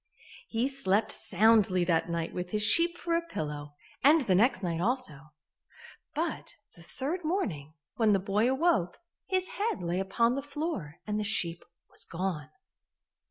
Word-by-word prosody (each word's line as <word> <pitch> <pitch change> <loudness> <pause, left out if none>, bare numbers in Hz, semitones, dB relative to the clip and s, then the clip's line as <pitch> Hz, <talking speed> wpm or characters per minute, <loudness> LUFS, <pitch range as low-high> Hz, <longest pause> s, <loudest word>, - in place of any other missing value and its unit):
He 230 +3 0
slept 225 -7 +1
soundly 205 -2 +3
that 170 -1 +1
night 170 -1 -2
with 180 0 -4
his 210 +2 0
sheep 340 +10 +4
for 340 -1 -1
a 335 - +2
pillow, 150 - -6 0.3
and 300 +4 +6
the 210 -8 +1
next 205 +1 +3
night 170 -2 -1
also, 170 - -2 0.8
but - - -3 0.2
the 170 - -15
third 285 - -4
morning, 170 - -2 0.2
when 220 -2 +4
the 200 - +5
boy 205 +5 +1
awoke, 265 - +1 0.3
his 370 -1 0
head 410 - -2
lay 175 +2 -1
upon 230 +5 +1
the 275 - -2
floor 290 - -4
and 210 0 -2
the - - -1
sheep 175 -5 0 0.3
was - - -5
gone. 170 -4 -4
210 Hz, 160 wpm, -29 LUFS, 170-275 Hz, 0.8 s, and